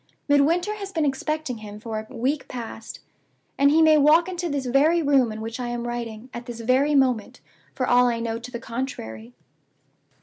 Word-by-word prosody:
Midwinter 325 +8 +3
has 395 -1 -6
been 320 -5 0
expecting 280 -2 -2
him 210 -1 -9
for 220 0 -4
a 220 +3 -11
week 265 +5 -1
past, 230 -2 -8 0.5
and 280 0 +4
he 320 +2 +5
may 310 -1 +6
walk 310 +4 +5
into 355 -2 -3
this 280 -3 -2
very 285 +7 +3
room 270 -5 +3
in 215 0 -7
which 225 +2 -5
I 245 - -3
am 240 0 -4
writing, 240 0 -6
at 240 +1 -7
this 235 -1 -7
very 260 +5 +2
moment, 255 -6 +1 0.4
for 255 - -1
all 245 0 +5
I 235 -1 0
know 230 0 -3
to 240 +1 -9
the 240 -2 -6
contrary. 125 - -6
255 Hz, 195 wpm, -24 LUFS, 230-290 Hz, 0.5 s, may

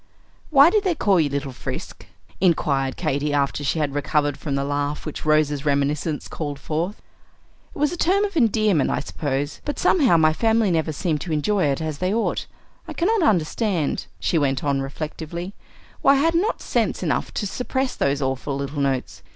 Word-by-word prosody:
'" - - -35
"Why 290 +2 +7
did 425 0 +2
they 365 -4 +1
call 200 - +3
you 150 -3 +2
Little 140 -1 -3
Frisk?" 125 - -7 0.3
inquired 140 -7 +1
Katy, 150 -2 -1
after 140 0 0
she 145 - 0
had 150 -3 -1
recovered 145 0 0
from 145 -3 -4
the 140 - 0
laugh 145 +1 -2
which 155 - -6
Rose's 150 -2 +2
reminiscences 145 +1 0
called 145 -3 -5
forth. 160 +7 -3 0.8
"It - - -9
was 295 +1 +1
a 350 - -5
term 385 +4 +2
of 400 -2 -6
endearment, 215 - +3
I - - 0
suppose; 145 0 -3
but 290 - -4
somehow 275 - +4
my 155 -1 +4
family 225 +1 +2
never 160 -1 0
seemed 155 -1 -1
to 170 - -5
enjoy 180 +5 +1
it 140 +1 0
as 155 -2 -4
they 185 +1 0
ought. 225 +2 -1 0.4
I - - -6
cannot 420 +5 +1
understand," 185 - 0
she 165 - +1
went 135 -3 0
on 140 -2 +1
reflectively, 160 +6 -5 0.5
"why 275 - +6
I - - +4
had 325 +4 +2
not 380 +8 0
sense - - 0
enough - - -1
to 210 - -1
suppress 260 +5 -2
those 140 0 0
awful 135 +1 -2
little 140 +1 -3
notes. 135 -2 -2
155 Hz, 190 wpm, -23 LUFS, 145-215 Hz, 0.8 s, Why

